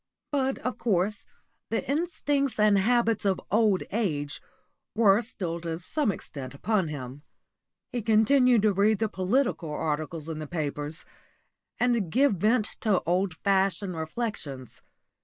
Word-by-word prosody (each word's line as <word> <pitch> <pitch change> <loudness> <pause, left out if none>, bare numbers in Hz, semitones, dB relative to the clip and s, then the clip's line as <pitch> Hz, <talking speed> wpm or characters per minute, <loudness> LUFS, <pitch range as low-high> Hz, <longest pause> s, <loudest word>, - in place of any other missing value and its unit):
But, 270 -2 0
of 255 - -2
course, 205 -1 0 0.4
the 225 - -2
instincts 290 -2 0
and 210 -1 +5
habits 230 +1 +2
of 195 -2 +1
old 210 -2 +3
age 155 -10 -2 0.5
were 215 -1 +5
still 175 -7 -4
to 165 -1 -4
some 230 - 0
extent 140 -7 -8
upon 195 +3 0
him. 140 -2 -7 0.7
He 245 - -2
continued 230 +2 +4
to 210 -2 +4
read 205 +3 +3
the 220 - 0
political 200 - 0
articles 155 +1 -3
in 160 -1 -4
the 155 - -5
papers, 150 0 -4 0.7
and 235 -8 +1
give 275 0 +4
vent 215 +4 +1
to 210 -4 +2
old 180 0 0
fashioned 195 -1 +1
reflections. 160 - -5
200 Hz, 135 wpm, -27 LUFS, 165-230 Hz, 0.7 s, and